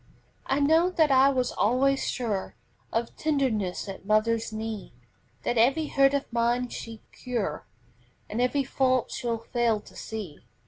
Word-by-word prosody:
I 270 - +1
know 320 +5 +4
that 320 -5 +2
I 265 +1 +6
was 255 -2 0
always 265 +5 +2
sure 215 -7 -3 0.4
Of 230 +1 -2
tenderness 250 -13 0
at 195 -1 -7
mother's 220 +2 +1
knee, 220 - -5 0.5
That 240 - +1
every 275 +7 +3
hurt 275 0 +4
of 280 - -1
mine 240 +1 +1
she'd 225 -2 -8
cure, 225 -12 -4 0.6
And 220 +4 -2
every 275 +3 +2
fault 255 -2 +1
she'd 235 -2 -2
fail 235 -3 +2
to - - -17
see. 205 -9 -7
240 Hz, 145 wpm, -27 LUFS, 220-275 Hz, 0.6 s, I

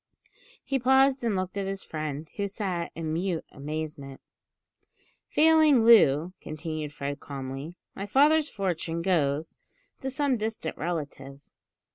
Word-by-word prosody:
He 270 -1 -1
paused 265 +1 +4
and 225 -4 +1
looked 185 +1 -2
at 195 - -2
his 195 0 -3
friend, 155 -1 -5
who 200 -1 -1
sat 190 -4 -3
in 160 -1 -3
mute 175 0 -1
amazement. 145 -2 -6 1.1
"Failing 310 -6 +5
Loo," 180 -7 +6
continued 155 -1 -5
Fred 140 0 -5
calmly, 135 +3 -6 0.2
"my 200 - -6
father's 295 +6 +4
fortune 170 -4 -2
goes 155 -4 0 0.4
to 265 - -3
some 270 -1 0
distant 215 -7 -3
relative." 145 -5 -5
175 Hz, 125 wpm, -27 LUFS, 150-225 Hz, 1.1 s, Loo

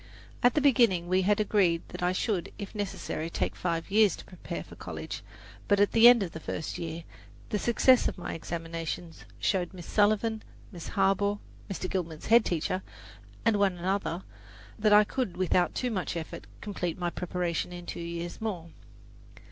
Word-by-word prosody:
At 245 - +4
the 300 - +3
beginning 230 -11 +4
we 185 +1 +3
had 205 +3 +2
agreed 195 -6 +2
that - - -7
I 180 0 +2
should, 185 -1 -1
if 200 -2 -7
necessary, 190 -6 -3
take - - -2
five 170 0 -2
years 210 -3 +5
to - - -12
prepare 180 - -7
for - - -13
college, - - -6 0.5
but 205 -1 +3
at 205 - +4
the 230 +1 +8
end 240 -3 +7
of 175 - -5
the 160 - -7
first 155 - -4
year 165 0 -5 0.5
the 210 - 0
success 240 +3 +4
of - - -3
my 175 - -5
examinations 165 0 -5
showed 185 -1 0
Miss 175 -2 -9
Sullivan, 215 +1 +2 0.3
Miss 175 -4 -8
Harbaugh 200 +1 +2 0.3
(Mr. 185 -1 -3
Gilman's 170 -5 -4
head 230 +1 +6
teacher), 180 +1 -1 0.6
and 225 -2 +4
one 195 -3 +2
other, 185 0 -1 0.6
that 215 0 +3
I 210 0 +8
could 225 -3 -3
without 180 -1 +2
too 250 -1 -1
much 185 -4 -2
effort 160 - -7
complete 180 -5 -3
my 175 -1 -1
preparation 180 -1 -2
in 175 0 -8
two - - -6
years 170 +2 -5
more. 180 -7 -4
185 Hz, 175 wpm, -29 LUFS, 170-210 Hz, 0.6 s, the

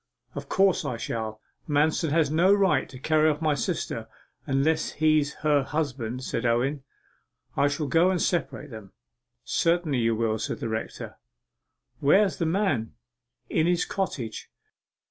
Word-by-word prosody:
'Of 140 -1 -7
course 195 -1 +3
I 120 - -3
shall! 110 -1 -4 0.3
Manston 155 +2 +2
has 155 -1 +2
no 170 +5 +4
right 190 -9 +3
to 130 - -10
carry 155 +3 +3
off 150 -1 -1
my 155 -2 +1
sister 140 - -3 0.4
unless 150 +4 +1
he's 155 -1 +2
her 145 -2 +4
husband,' 130 -4 -3
said 115 - -3
Owen. 125 +4 +1 0.7
'I 145 - +3
shall 145 +2 -2
go 165 +6 +3
and 185 -2 0
separate 165 -5 -2
them.' 110 -4 -10 0.5
'Certainly 165 -5 +1
you 115 -1 +1
will,' 110 -1 0
said - - -3
the 115 - -3
rector. 110 0 -5 0.8
'Where's 190 +7 +3
the 165 - 0
man?' 160 - 0 0.5
'In 160 +5 +1
his 175 -1 +2
cottage. 130 - -4
150 Hz, 145 wpm, -26 LUFS, 125-165 Hz, 0.8 s, no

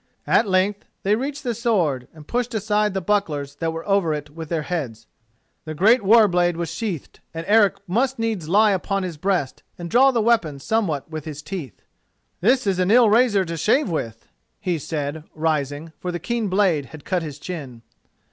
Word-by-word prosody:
At - - +3
length 195 +2 +1 0.2
they 200 - +2
reached 275 +5 -4
the 245 -3 -1
sword, 180 - 0
and 155 -1 -15
pushed 245 -1 -2
aside 210 -1 0
the 190 - 0
bucklers 155 -8 -1
that 165 +1 -1
were 165 +3 -7
over 195 -6 +2
it 145 0 -7
with 160 0 -8
their 165 -3 -1
heads. 130 -11 -4 0.6
The 155 -1 -6
great 220 +10 +5
war 215 +2 +6
blade 175 -2 +1
was 170 -1 -3
sheathed, 200 - -5 0.2
and 165 +1 -4
Eric 210 -1 +5
must 245 +8 0
needs 220 -8 -2
lie 210 +3 +5
upon 195 +1 -1
his 175 -4 -5
breast 180 -5 -1 0.2
and 170 -1 -7
draw 260 +3 +6
the 245 -3 +1
weapon 215 -10 +2
somewhat 165 -2 -1
with 155 -2 -6
his 150 -2 -7
teeth. 150 - -7 0.6
"This 250 +6 +3
is 190 -2 0
an 185 0 +2
ill 230 -1 +6
razor 215 -4 +4
to 170 0 -4
shave 215 - +2
with," 115 -8 -4 0.3
he 175 -3 -1
said, 150 +1 -4
rising, 155 0 -2
for 180 - -3
the 175 - -3
keen 230 +5 -2
blade 185 -7 +1
had 150 +5 -12
cut 180 -2 0
his 150 -3 -6
chin. 140 -8 -7
180 Hz, 195 wpm, -22 LUFS, 155-210 Hz, 0.6 s, war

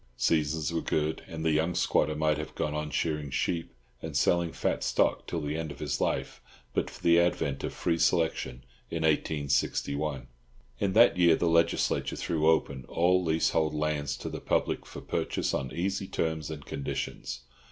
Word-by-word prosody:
Seasons 80 0 +1
were 80 - 0
good, 80 +1 -1
and 80 0 -5
the 80 - +3
young 80 +3 +1
squatter 75 - +2
might 75 -1 +1
have 75 - -6
gone 75 - -1
on 75 0 -3
shearing 75 0 -1
sheep 80 +5 -1 0.3
and - - -3
selling 85 -1 +2
fat - - -1
stock - - +1
till 85 - -2
the 75 +1 -2
end 80 -1 -3
of - - -9
his 70 -5 -2
life - - -1 0.3
but - - 0
for - - -13
the 85 0 +6
advent 80 -5 0
of - - -2
free 85 - -1
selection 80 -8 +1 0.3
in 80 -1 -2
1861. 70 -2 0 0.5
In 100 -2 0
that 115 -3 +6
year 85 -2 +6
the 85 - 0
Legislature 85 0 +2
threw 80 -1 +1
open 70 -5 +1
all 90 +2 +3
leasehold 80 -1 +1
lands 75 -2 -1
to - - -6
the - - -5
public - - 0
for - - -8
purchase - - -1
on 65 -1 -2
easy 95 +2 -2
terms 80 -4 -2
and 75 -2 -7
conditions. 70 -2 -4
80 Hz, 175 wpm, -29 LUFS, 75-85 Hz, 0.5 s, the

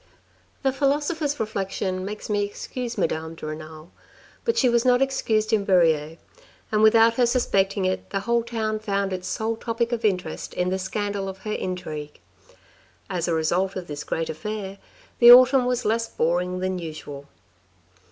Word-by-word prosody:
The 270 - +3
philosopher's 290 +2 0
reflection 195 -3 -2
makes 210 +2 -6
me 205 -1 0
excuse 235 +4 -5
Madame 160 0 -2
de 160 - -9
Renal, 155 +1 -8 0.5
but 460 - 0
she 260 - +4
was 235 -1 +3
not 250 -1 +4
excused 225 -5 0
in 210 -2 +3
Verrieres, 165 -5 +2 0.5
and 215 -1 +2
without 225 +1 +6
her 245 -2 +4
suspecting 195 -5 +1
it, 185 0 -2
the 195 - -2
whole 235 +3 +1
town 220 -2 -2
found 200 -2 -1
its 185 0 -5
sole 220 +4 -2
topic 230 +1 -2
of 235 -1 -2
interest 190 -4 -2
in 180 0 0
the 190 +1 -1
scandal 200 0 -3
of 190 - -8
her 215 - -2
intrigue. 155 -5 -5 0.9
As 180 -2 -1
a 170 - +1
result 175 +4 0
of 185 -2 -5
this 150 -2 -6
great 165 -1 -2
affair, 195 +4 -6 0.4
the 240 0 +10
autumn 255 +1 +8
was 250 -1 -1
less 230 +2 0
boring 180 +2 -1
than 185 0 -1
usual. 150 -4 -8
200 Hz, 165 wpm, -24 LUFS, 180-230 Hz, 0.9 s, the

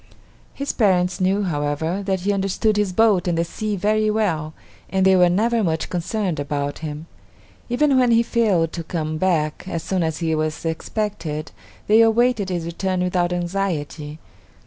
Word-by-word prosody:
His 280 0 -2
parents 185 -4 +2
knew, 195 +2 +2
however, 160 +2 -1
that 190 -2 0
he 205 +3 +1
understood 200 +2 0
his 205 -2 +1
boat 205 -2 +3
and 170 -1 0
the 165 - +2
sea 210 +4 -3
very 215 +3 +1
well, 165 -8 -1 0.3
and 190 0 +1
they 190 0 +6
were 180 -1 +5
never 225 +5 +1
much 160 -3 -1
concerned 180 -1 -2
about 145 0 -3
him. 155 0 -6 0.6
Even 270 +2 +3
when 250 -1 +3
he 230 0 +4
failed 200 -9 +1
to 170 - -4
come 155 -1 -3
back 155 -5 0
as 165 -3 -3
soon 185 +2 -1
as 160 -1 -1
he 165 -1 -1
was 155 +1 -2
expected, 165 -2 -3 0.3
they 220 +2 +5
awaited 225 -2 +3
his 175 -3 -2
return 180 +2 -2
without 180 -1 0
anxiety. 170 -4 -3
180 Hz, 170 wpm, -22 LUFS, 160-210 Hz, 0.6 s, they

